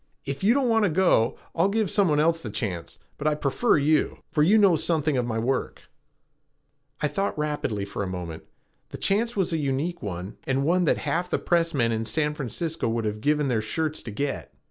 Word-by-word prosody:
If 140 +5 -4
you 225 +5 +5
don't 275 -3 +2
want 225 -2 +3
to 205 - +3
go, 160 -9 +3 0.2
I'll 170 +4 +2
give 215 -1 0
some 200 -4 +3
one 150 -1 +2
else 165 +2 +2
the - - -6
chance, 90 -8 -4 0.2
but 150 - -1
I 150 - +2
prefer 150 - +2
you, 150 +2 +1
for 150 - +1
you 190 +8 +5
know 200 -5 +5
something 155 -2 +1
of 125 -2 0
my 115 -1 -2
work." 125 +3 -2 1.2
I - - +4
thought 195 +6 -2
rapidly 145 -9 -2
for 100 0 -5
a 100 - -2
moment. 90 -3 -6 0.4
The - - -7
chance 225 +3 0
was 185 -3 +1
a 160 - 0
unique 145 +5 -2
one 95 -1 -6
and 135 +1 0
one 180 +3 +3
that - - +3
half 175 +2 -1
the - - +1
press 170 -2 +1
men 115 -3 +2
in 110 0 -2
San 150 +6 0
Francisco 150 +1 -3
would 115 0 -1
have 105 0 -3
given 150 +2 +2
their 120 -4 +1
shirts 155 +8 -2
to - - -8
get. 135 +6 -3
150 Hz, 215 wpm, -25 LUFS, 115-175 Hz, 1.2 s, you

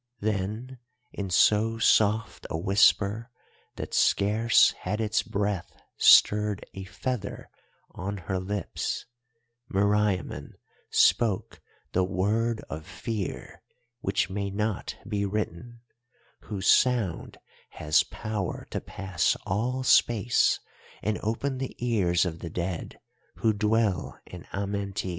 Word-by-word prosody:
"Then 110 +5 -3 0.3
in 100 -2 -4
so 110 +5 +3
soft 110 0 +2
a - - -2
whisper 105 +5 +3 0.5
that - - -6
scarce 110 +4 +4
had 105 +4 -4
its 110 -1 +1
breath 100 -2 -2 0.2
stirred 105 -1 +5
a 95 0 -7
feather 110 +1 -5 0.4
on 100 +2 -5
her 95 +1 -3
lips, 100 +2 -3 0.7
Meriamun 100 -1 0 0.4
spoke 110 -6 +2 0.3
the 95 - +2
Word 105 +5 0
of 80 0 -6
Fear 100 +1 -5 0.4
which 95 - 0
may 100 +1 -3
not 105 +1 -3
be 105 -2 -1
written, 105 +3 -4 0.6
whose 100 -3 -5
sound 120 -9 +2 0.3
has 75 0 +2
power 105 -4 -4
to - - -3
pass 95 -3 -1
all 125 +7 -1
space 120 -2 +3 0.4
and 105 +1 -1
open 130 +5 -2
the 130 - -4
ears 95 -8 +1
of 85 -2 -4
the 85 - -6
dead 85 +1 -4 0.4
who 110 -1 +1
dwell 105 -3 0
in - - -11
Amenti. 100 -1 -3
105 Hz, 110 wpm, -27 LUFS, 95-110 Hz, 0.7 s, stirred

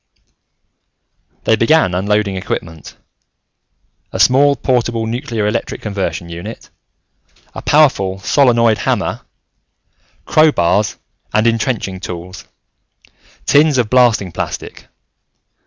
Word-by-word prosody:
They 110 - +3
began 115 - +2
unloading 100 +2 0
equipment 80 -4 -6 1.1
a - - -5
small, 140 +2 +4
portable 120 -3 -1
nuclear 115 -2 -3
electric 105 +3 -3
conversion 100 -4 -3
unit, 85 +1 -9 0.8
a - - -7
powerful 130 -11 +2
solenoid 115 0 +2
hammer, - - -1 1.0
crowbars 105 - +2 0.4
and 110 +1 +3
intrenching 115 -4 -1
tools, 90 0 -8 1.0
tins 150 -1 +4
of 120 -4 0
blasting 120 -7 +3
plastic. - - -6
110 Hz, 90 wpm, -16 LUFS, 95-125 Hz, 1.1 s, small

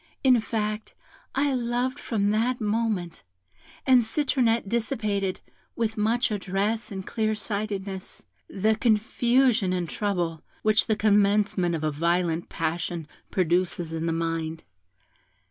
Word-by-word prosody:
In 255 -3 +6
fact, 215 -1 -3 0.4
I 280 0 +2
loved 250 +2 -1
from 205 -6 0
that 235 +4 +1
moment, 210 -6 -1 0.6
and 255 -2 +6
Citronette 235 -3 +1
dissipated, 210 -4 -1 0.3
with 225 -1 -1
much 225 +2 +1
address 205 +3 -1
and 190 -1 -5
clear 220 -1 0
sightedness, 200 -3 -4 0.2
the 215 +3 +1
confusion 230 -1 +2
and 180 -2 -1
trouble 175 -4 -2 0.2
which 215 0 +3
the 220 - +2
commencement 205 -4 +3
of 155 - -4
a 155 - +1
violent 170 +2 0
passion 165 0 -2 0.2
produces 175 -2 0
in 165 +1 -2
the - - +1
mind. 165 -1 -2
210 Hz, 120 wpm, -26 LUFS, 180-225 Hz, 0.6 s, In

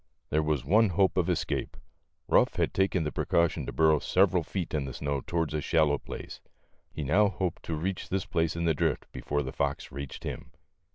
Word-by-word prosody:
There 75 - +3
was 75 -3 -1
one 105 +7 +4
hope 95 +1 +2
of 90 -1 +1
escape. 85 -5 -2 0.5
Ruff - - +4
had - - 0
taken 95 -3 +1
the 75 - -2
precaution 85 +2 +1
to - - -3
burrow 80 -2 +4
several 90 +3 +3
feet 85 +2 -4
in 75 -3 0
the 65 - -6
snow 70 -1 -2
towards 80 0 -2
a 75 - -1
shallow 75 -3 +2
place; - - -8 0.5
he 75 - -5
now 100 +10 +4
hoped 95 -4 -3
to 80 - -2
reach 90 +4 -3
this 95 0 -1
place 80 -2 0
in 85 0 -1
the 80 - +3
drift 75 - 0
before 75 0 -2
the - - -6
fox - - -2
reached 70 0 -7
him. - - -6
80 Hz, 205 wpm, -29 LUFS, 75-90 Hz, 0.5 s, one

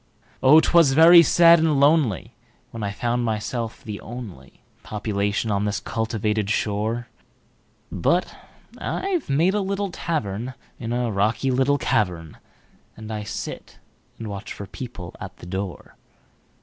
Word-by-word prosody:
Oh! 140 +4 +7
'twas 165 -4 +4
very 165 +3 +9
sad 170 0 +6
and 160 -2 +2
lonelyWhen 140 - +2 0.5
I 100 -1 -2
found 120 +3 -1
myself 115 +1 -3
the 105 -2 -7
onlyPopulation 105 - -5
on 100 0 0
this 105 -1 -1
cultivated 110 -2 -2
shore; 110 +3 -1 0.8
But - - 0 0.4
I've 370 - -2
made 165 +7 +2
a 210 - 0
little 200 0 -2
tavernIn 125 - -3 0.4
a 120 -1 -1
rocky 110 +6 0
little 135 +3 +2
cavern, 85 - -1 0.6
And 110 0 -8
I 105 - -3
sit 105 - -7 0.4
and 115 - -7
watch 100 +1 -7
for 100 - -8
people 95 -6 -9
at 95 -1 -8
the - - -12
door. 95 +1 -6
115 Hz, 125 wpm, -23 LUFS, 105-145 Hz, 0.8 s, very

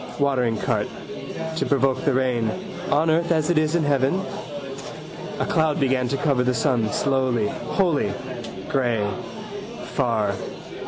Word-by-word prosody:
Watering 125 -5 +2
cart. - - 0 0.7
To - - +1
provoke 135 -1 +2
the 140 - +4
rain. 125 -3 +2 0.4
On 155 +3 +4
earth 170 +2 +2
as 160 0 +3
it 160 - +4
is 155 +1 +1
in 170 - +3
heaven. 140 +4 +2 1.2
A - - +1
cloud 160 -2 +2
began 130 -2 +2
to 140 - 0
cover 140 -3 +2
the 125 0 +2
sun 115 -3 +2
slowly, 130 -6 +2
wholly. 165 - +1 0.6
Grey. 120 -6 +2 0.9
Far. 115 -7 +2
135 Hz, 130 wpm, -24 LUFS, 125-150 Hz, 1.2 s, the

